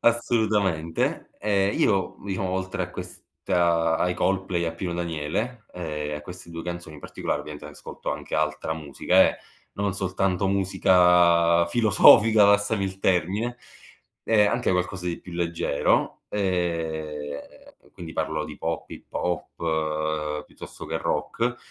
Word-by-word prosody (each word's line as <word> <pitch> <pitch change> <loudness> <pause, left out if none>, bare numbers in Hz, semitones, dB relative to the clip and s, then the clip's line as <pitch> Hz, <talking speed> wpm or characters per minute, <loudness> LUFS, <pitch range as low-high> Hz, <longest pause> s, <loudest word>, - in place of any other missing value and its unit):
assolutamente. 105 -8 +1
E 100 -2 +1
io, 100 -2 +1
diciamo, 95 -1 -2
oltre 95 0 -2
a - - -5
questa 85 -2 -1
ai 90 0 +1
Coldplay, 95 -2 0
a 80 - -2
Pino 85 +1 -4
Daniele 85 +8 -3
e 75 -4 -4
a 75 - -5
queste 90 +1 -10
2 85 0 -6
canzoni 85 -2 -6
in - - -13
particolare, - - -3
ovviamente, 75 -1 -9
ascolto - - -7
anche - - -5
altra 80 - -1
musica, 75 -4 +3
eh, - - -9 0.4
non 100 -1 -1
soltanto 95 0 0
musica 90 -3 +4
filosofica, 110 +1 +6
passami 100 +1 +3
il 95 0 -5
termine, 100 +8 0 0.7
e 110 -2 +4
anche 120 +4 +1
qualcosa 90 0 -2
di 85 - -3
più 90 - -11
leggero. 85 -4 0
E, 80 -6 -3 0.2
quindi, 85 -2 -9
parlo 80 -1 -2
di - - -9
pop, - - -3
hip - - -10
hop, 80 -3 -2
piuttosto - - -10
che - - -2
rock, 120 +1 -1
90 Hz, 135 wpm, -25 LUFS, 80-100 Hz, 0.7 s, filosofica